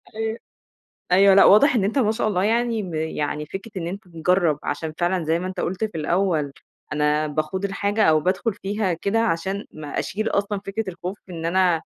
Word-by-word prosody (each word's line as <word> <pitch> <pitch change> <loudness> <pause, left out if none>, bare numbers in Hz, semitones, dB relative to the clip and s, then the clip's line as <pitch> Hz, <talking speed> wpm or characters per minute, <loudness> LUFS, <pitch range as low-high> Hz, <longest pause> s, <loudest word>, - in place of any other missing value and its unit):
أيوه، 220 +1 -2 0.8
أيوه 195 +1 +7
لأ 195 - +7
واضح 265 +7 +6
إن 205 -5 +2
أنت 220 +7 0
ما 220 -4 +3
شاء 220 -1 -1
الله 185 -2 0
يعني 230 0 +1
م 180 -3 -6
يعني 150 -1 -2
فكرة 190 +7 -7
إن 170 - -3
أنت 190 +3 -6
مجرّب 170 -2 +1
عشان 155 +2 -3
فعلًا 175 -1 0
زي 165 +2 +1
ما 180 - -4
أنت 185 - -4
قُلت 190 +5 -2
في 215 - -5
الأول، 160 -3 0 0.4
أنا 150 +1 +1
باخوض 155 +6 -2
الحاجة 200 +2 0
أو 155 -1 +4
بادخل 190 +5 0
فيها 200 -2 -2
كده 200 +7 -1
عشان 195 -1 -1
ما 150 -1 -8
أشيل 215 +3 -2
أصلًا 200 0 -1
فكرة 215 +3 -2
الخوف 180 +2 -5
إن 165 -2 -4
أنا 175 -2 +2
190 Hz, 195 wpm, -23 LUFS, 165-205 Hz, 0.8 s, أيوه